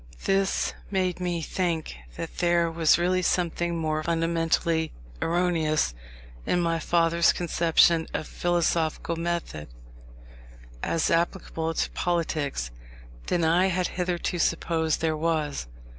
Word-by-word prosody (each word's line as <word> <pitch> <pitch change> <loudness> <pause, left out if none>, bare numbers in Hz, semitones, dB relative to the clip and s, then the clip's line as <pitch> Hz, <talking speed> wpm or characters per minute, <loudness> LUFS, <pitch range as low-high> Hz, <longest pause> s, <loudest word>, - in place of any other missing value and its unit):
This 195 0 +1 0.2
made 185 -3 0
me 175 -2 -2
think 165 - -2 0.2
that - - -6
there 170 -1 +2
was 165 -2 +4
really 180 +1 +1
something 175 -1 0
more 155 -1 -1
fundamentally 165 0 0 0.3
erroneous 165 - +1 0.5
in 180 - +1
my 165 -1 +1
father's 170 +1 +3
conception 170 -1 +3
of - - -3
philosophical 170 -1 0
method, 165 - -3 1.1
as 165 - 0
applicable 165 -1 -1
to - - -1
politics, 155 - -1 0.6
than 175 - +1
I 170 +4 +4
had 185 -1 0
hitherto 180 0 -2
supposed 165 -1 0
there 160 -1 +1
was. 155 - -1
170 Hz, 115 wpm, -26 LUFS, 160-175 Hz, 1.1 s, was